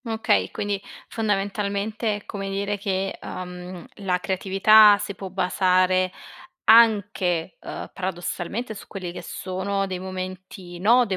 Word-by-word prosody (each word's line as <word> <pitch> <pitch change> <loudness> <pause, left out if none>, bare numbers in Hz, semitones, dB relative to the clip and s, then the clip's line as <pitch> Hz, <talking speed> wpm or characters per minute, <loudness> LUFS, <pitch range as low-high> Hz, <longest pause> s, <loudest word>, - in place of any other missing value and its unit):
Okay, 220 - +1
quindi, 205 -1 -3 0.3
fondamentalmente, 205 +1 -1
è 205 - -9
come 195 -1 -5
dire 200 +1 -2
che, 195 -1 -2
ehm, 180 0 -7
la 190 -3 0
creatività 200 +3 +6
si 200 0 -4
può 195 -1 -7
basare 185 0 +2 0.5
anche, 205 -6 +4
ehm, - - -7
paradossalmente, 190 +4 -4
su 205 - -11
quelli 185 -3 -6
che 175 - -8
sono 195 +1 -3
dei 185 -1 -4
momenti 185 -1 -7
no, 240 +5 +5
dei 195 -3 -1
195 Hz, 130 wpm, -24 LUFS, 185-205 Hz, 0.5 s, creatività